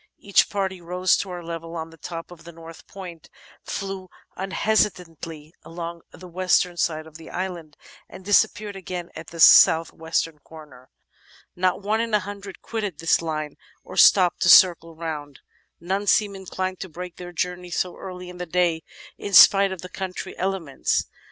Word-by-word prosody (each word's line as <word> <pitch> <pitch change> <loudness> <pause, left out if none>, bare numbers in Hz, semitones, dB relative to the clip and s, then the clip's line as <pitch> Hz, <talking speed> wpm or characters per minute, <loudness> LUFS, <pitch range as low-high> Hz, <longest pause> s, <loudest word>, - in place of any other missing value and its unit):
Each 200 - +2
party 190 -2 -3
rose 180 +2 +1
to 195 - -4
our 175 -1 -6
level 165 0 -7
on 165 0 -5
the - - -14
top 165 +2 -8
of 170 -2 -13
the 170 - -11
north 165 0 -13
point, 180 -5 -10 0.3
flew 195 -1 -5 0.3
unhesitatingly 180 -6 -2
along 170 0 -7
the 185 - -13
western 180 0 +1
side 155 -2 -1
of 160 -1 -13
the 160 - -12
island, 175 -5 -6 0.3
and 185 - -12
disappeared 205 0 +2
again 180 -2 -6
at 160 - -9
the 165 - -11
south 165 0 +7
western 160 -1 -2
corner. 150 -5 -15 0.7
Not 185 +2 0
one 215 +2 +1
in 230 -2 0
a - - +4
hundred 200 -1 -9
quitted 210 -8 -4
this 165 +2 +2
line 155 -2 -4 0.3
or - - -11
stopped 180 -3 +5
to - - +3
circle 165 -3 +6
round; 150 -4 -6 0.4
none 195 +4 -2
seemed 205 0 +3
inclined 185 -1 -4
to 190 - -6
break 180 +2 -8
their 175 0 -8
journey 180 +1 -3
so 180 +1 -2
early 180 -1 -8
in 180 0 -10
the 180 - -5
day, 170 -1 +1 0.4
in 200 - -6
spite 195 +1 +8
of 190 -2 -7
the - - -6
contrary 190 -1 -6
elements. 185 -7 -1
180 Hz, 170 wpm, -24 LUFS, 165-190 Hz, 0.7 s, spite